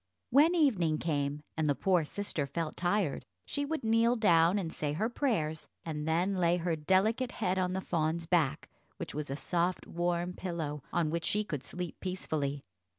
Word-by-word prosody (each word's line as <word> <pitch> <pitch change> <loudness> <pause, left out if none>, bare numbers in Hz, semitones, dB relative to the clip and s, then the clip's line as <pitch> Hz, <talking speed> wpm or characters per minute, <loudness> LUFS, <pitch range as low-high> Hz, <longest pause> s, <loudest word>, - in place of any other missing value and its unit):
When 305 +7 +6
evening 195 - +3
came, 145 -2 -1
and 160 -1 0
the 145 - +2
poor 180 0 +2
sister 160 -5 -2
felt 155 +3 -3
tired, 175 -3 0 0.2
she 285 0 -2
would 315 -2 -3
kneel 230 +2 +3
down 175 -4 +4
and 170 -5 -3
say 145 -1 -2
her 215 +9 0
prayers, 180 - -1 0.2
and 155 -2 -3
then 175 +5 +2
lay 175 -1 +3
her 170 -1 0
delicate 200 - +2
head 185 +1 0
on 180 0 0
the 190 - -1
fawn's 165 -1 -1
back, 165 -5 +1 0.3
which - - -5
was 150 -1 -4
a 135 - -2
soft 175 +4 -1
warm 175 +1 -1
pillow, 160 -6 -4
on 160 -3 +1
which 170 0 -2
she 210 +1 +1
could 155 -10 -4
sleep 180 +2 -6
peacefully. 150 -7 -2
175 Hz, 180 wpm, -31 LUFS, 155-195 Hz, 0.3 s, When